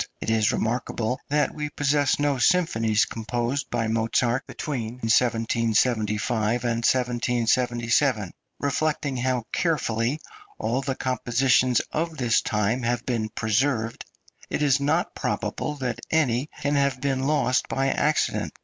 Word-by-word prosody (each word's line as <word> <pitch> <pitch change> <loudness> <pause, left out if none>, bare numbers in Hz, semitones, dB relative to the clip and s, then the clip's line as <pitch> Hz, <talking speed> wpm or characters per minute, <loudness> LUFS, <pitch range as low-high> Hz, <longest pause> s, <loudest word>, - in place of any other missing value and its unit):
It - - -2
is 110 -2 +3
remarkable 120 +1 -2
that 150 +1 +1
we 150 -1 -4
possess 145 -1 +1
no 145 -2 0
symphonies 115 - +3
composed 120 +5 -3
by 115 -2 -1
Mozart 115 +3 0
between 120 -7 -4
1775 115 -1 +1
and 120 -1 0
1777. 120 - +1 0.3
Reflecting 145 -1 -1
how 125 -1 0
carefully 135 -5 0 0.4
all 125 +3 -1
the 135 -1 -2
compositions 130 0 +2
of 160 0 -2
this 120 -3 +2
time 110 +2 0
have 120 0 -1
been 115 -4 -1
preserved, 115 +2 0 0.5
it 150 - -1
is 140 -1 +3
not 140 +1 0
probable 150 - -3
that 125 -4 -3
any 140 -3 +1
can 145 +1 0
have 140 -2 +1
been 135 -1 -1
lost 145 -4 +1
by 135 0 0
accident. 150 +1 0
125 Hz, 125 wpm, -25 LUFS, 115-140 Hz, 0.5 s, is